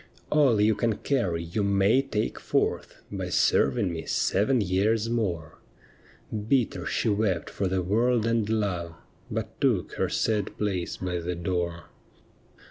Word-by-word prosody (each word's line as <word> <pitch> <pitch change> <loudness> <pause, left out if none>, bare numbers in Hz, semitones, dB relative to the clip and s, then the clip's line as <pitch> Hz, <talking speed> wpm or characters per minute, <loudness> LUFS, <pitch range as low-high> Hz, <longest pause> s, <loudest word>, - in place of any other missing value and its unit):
' 85 - -32
All 140 -8 +4
you 105 +1 +4
can 115 +1 0
carry 95 -12 -1
you 85 +6 -2
may 100 +5 +3
take 110 -6 -2
forth - - -1
By - - -4
serving 100 -8 +2
me 80 - -6
seven 110 +7 +2
years 105 +4 +1
more.' 90 -9 -2 0.9
Bitter 125 -2 +1
she - - -1
wept 100 -4 0
for 100 - -1
the 95 0 0
world 115 +4 +2
and 115 -2 +1
love. 90 -6 -1 0.3
But - - -5
took - - +1
her - - 0
sad 105 -3 -1
place 95 -4 -2
by 90 -2 -2
the 90 +1 -3
door. 85 -1 -3
100 Hz, 145 wpm, -27 LUFS, 90-115 Hz, 0.9 s, All